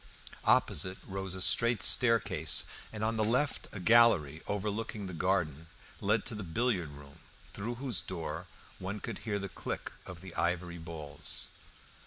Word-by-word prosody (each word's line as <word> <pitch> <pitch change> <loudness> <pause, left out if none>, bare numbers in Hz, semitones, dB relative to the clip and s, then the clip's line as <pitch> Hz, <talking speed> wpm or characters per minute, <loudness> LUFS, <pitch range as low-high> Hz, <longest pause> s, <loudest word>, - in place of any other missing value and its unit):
Opposite 95 +5 +3
rose 95 -1 -4
a 95 - -1
straight 115 -1 +3
staircase, 115 -3 +4 0.3
and 110 -1 -4
on 110 +1 +1
the 110 - +3
left 125 +6 +1
a 100 - -6
gallery 90 -8 +5
overlooking 105 +1 -2
the 95 - -6
garden 85 -3 0 0.3
led 105 +3 +2
to 130 - -3
the 105 - -4
billiard 95 -1 0
room, 70 +1 -12 0.3
through 115 +4 -3
whose 120 -8 -1
door 85 -1 -5 0.3
one 95 +3 -4
could - - -5
hear 105 -3 -2
the 100 -1 -3
click - - -5 0.2
of 90 -2 -8
the 95 -2 -9
ivory 85 0 -1
balls. 80 -3 -4
95 Hz, 155 wpm, -32 LUFS, 85-110 Hz, 0.3 s, gallery